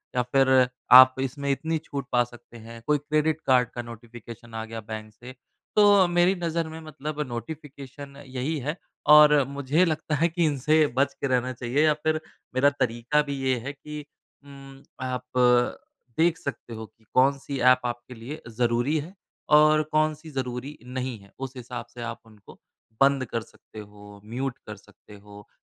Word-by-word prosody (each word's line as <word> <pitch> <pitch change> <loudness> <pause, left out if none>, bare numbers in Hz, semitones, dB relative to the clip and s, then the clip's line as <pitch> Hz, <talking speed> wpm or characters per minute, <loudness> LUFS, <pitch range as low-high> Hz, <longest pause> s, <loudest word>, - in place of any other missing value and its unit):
या 125 - +3
फिर 135 +2 +2 0.4
आप 130 0 +10
इसमें 140 +2 -3
इतनी 160 +4 -1
छूट 140 -1 -5
पा 120 -1 +4
सकते 120 0 -14
हैं। 115 +1 -11
कोई 150 0 +3
क्रेडिट 155 +2 0
कार्ड 125 -2 +4
का 120 - -3
नोटिफ़िकेशन 115 0 -11
आ 110 - -3
गया 115 0 -7
बैंक 110 0 -8
से 125 +4 -12 0.4
तो 205 -3 +6
मेरी 175 +2 +3
नज़र 165 -1 -1
में 160 +1 -8
मतलब 155 -1 -7
नोटिफ़िकेशन 140 +1 -8
यही 130 +4 -3
है। 150 +4 -3 0.4
और 150 0 +9
मुझे 140 +5 +1
लगता 155 -1 -1
है 165 +4 +2
कि 170 0 0
इनसे 150 +1 +3
बच 140 +1 +2
के 140 - -3
रहना 125 0 0
चाहिए 125 +4 0
या 155 - +4
फिर 155 0 +1 0.4
मेरा 140 +2 +5
तरीका 130 +1 0
भी 140 - -2
ये 130 -1 +2
है 135 +5 -6
कि 150 +1 -9 0.4
उम 135 -1 -13 0.2
आप 125 0 -3 1.0
देख 165 0 +3
सकते 140 -7 -7
हो 110 0 -7
कि 110 - -25
कौन-सी 140 +1 +1
ऐप 125 0 +3
आपके 120 +1 -5
लिए 125 +7 -8 0.2
ज़रूरी 120 +5 +1
है 165 +6 -8 0.4
और 155 0 +5
कौन-सी 155 +1 0
ज़रूरी 130 +2 -5
नहीं 125 -1 -4
है। 100 0 -19
उस 135 0 -6
हिसाब 120 -1 -7
से 120 - -9
आप 120 - -6
उनको 110 -2 -17 0.4
बंद 135 -1 +4
कर 115 -1 -3
सकते 110 - -14
हो, 105 -1 -13
म्यूट 125 +4 -4
कर - - -6
सकते 105 - -18
हो, 100 0 -14
135 Hz, 175 wpm, -25 LUFS, 120-150 Hz, 1.0 s, आप